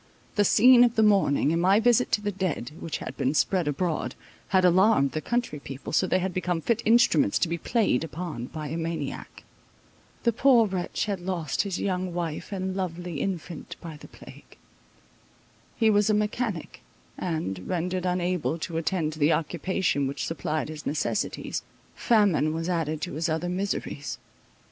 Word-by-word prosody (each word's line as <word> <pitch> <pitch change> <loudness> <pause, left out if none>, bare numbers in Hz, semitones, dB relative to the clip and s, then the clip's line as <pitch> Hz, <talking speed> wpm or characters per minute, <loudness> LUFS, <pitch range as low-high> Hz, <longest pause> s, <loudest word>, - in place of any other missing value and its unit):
The 205 - +3
scene 245 +4 +7
of 240 -1 +2
the 220 - +4
morning, 190 -8 +3
and 165 - +1
my 190 +4 +5
visit 245 +2 +3
to 210 - +3
the 205 0 -1
dead, 180 -10 -3
which 165 - -4
had - - -7
been 135 +4 0
spread 180 0 +1
abroad, 155 +3 -1 0.3
had 190 -1 +3
alarmed 180 -5 +4
the 155 - -3
country 240 -10 -2
people, 135 -1 -8
so 185 - +3
they 185 - +2
had 185 0 -2
become 180 -2 -1
fit 230 +7 0
instruments 220 - +4
to - - +1
be 170 +1 -3
played 210 - +1
upon 160 -6 -5
by 155 0 -6
a 160 - -3
maniac. 165 0 -5 0.8
The 235 - +3
poor 245 -1 +5
wretch 185 -3 -2
had 200 -3 -2
lost 175 -5 -2
his 195 -3 -3
young 185 -2 -2
wife 170 0 -4
and 190 -1 -3
lovely 175 -4 -4
infant 175 -4 -4
by 165 -2 -8
the 150 - -12
plague. - - -15 1.2
He 225 -2 +4
was 205 0 +3
a 215 - +4
mechanic; 210 -3 -2 0.3
and, 155 - -3
rendered 180 +1 -1
unable 180 -2 0
to 165 0 -4
attend 165 -2 -1
to 155 - -10
the 150 +2 +4
occupation 165 -3 0
which 140 - -3
supplied 155 -1 -2
his 155 -1 -7
necessities, 150 - -2 0.3
famine 200 -9 +2
was 165 +1 -3
added 160 -3 -1
to 180 - -4
his 160 +3 -1
other 160 +3 -1
miseries. 180 -5 -3
180 Hz, 170 wpm, -26 LUFS, 155-195 Hz, 1.2 s, scene